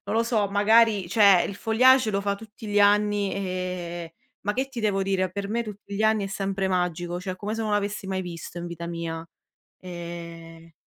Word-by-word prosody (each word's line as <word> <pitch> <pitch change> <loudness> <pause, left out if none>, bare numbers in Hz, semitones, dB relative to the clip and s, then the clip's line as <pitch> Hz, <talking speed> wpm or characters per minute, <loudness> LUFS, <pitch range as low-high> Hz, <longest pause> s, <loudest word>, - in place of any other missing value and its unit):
lo 230 - +4
so, 220 -4 +1
magari 210 -1 +4
cioè 200 -3 +6
il 200 - -6
feuillage 250 +1 +4
lo 200 0 0
fa 200 0 0
tutti 220 +1 -11
gli 205 0 +2
anni, 205 -1 +3
eh, 180 -3 -4 0.3
ma 205 +1 -1
che 265 +3 -1
ti 250 -3 -6
devo 200 -3 +1
dire? 190 -2 0
Per 200 0 -4
me 235 +2 0
tutti 205 -1 -8
gli 215 - 0
anni 220 -2 +3
è - - -4
sempre 195 0 -2
magico, 175 -1 -1
cioè 185 0 -5
come 210 +3 -4
se 225 - -3
non 215 -1 -2
l'avessi 205 -1 -1
mai 190 -1 -2
visto 175 -1 -8
in 175 - -5
vita 170 0 -6
mia. 165 -1 -5 0.5
Ehm 170 -2 -9
195 Hz, 200 wpm, -25 LUFS, 175-210 Hz, 0.5 s, cioè